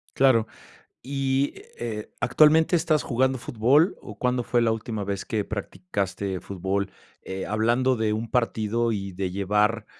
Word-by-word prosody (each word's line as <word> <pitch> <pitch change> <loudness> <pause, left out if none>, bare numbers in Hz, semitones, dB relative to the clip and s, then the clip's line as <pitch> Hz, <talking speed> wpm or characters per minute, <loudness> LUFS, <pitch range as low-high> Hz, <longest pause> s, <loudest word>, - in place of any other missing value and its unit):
Claro, 130 -5 +4 0.6
y, 135 0 0 0.2
eh, 110 -3 -5
¿actualmente 155 +6 +5
estás 160 -4 +2
jugando 130 +2 +1
fútbol 130 - +3
o - - -10
cuándo 125 0 +1
fue 120 - +1
la 115 -1 +3
última 110 -1 -3
vez 100 -1 -3
que 105 -2 -2
practicaste 100 - -3
fútbol?, 95 +1 -2 0.3
eh, 95 0 -5
hablando 120 +5 +2
de 110 -1 0
un 110 +1 -4
partido 115 -1 +1
y 100 -3 -3
de 95 +1 -3
llevar, 105 +4 +1
115 Hz, 145 wpm, -25 LUFS, 100-130 Hz, 0.6 s, actualmente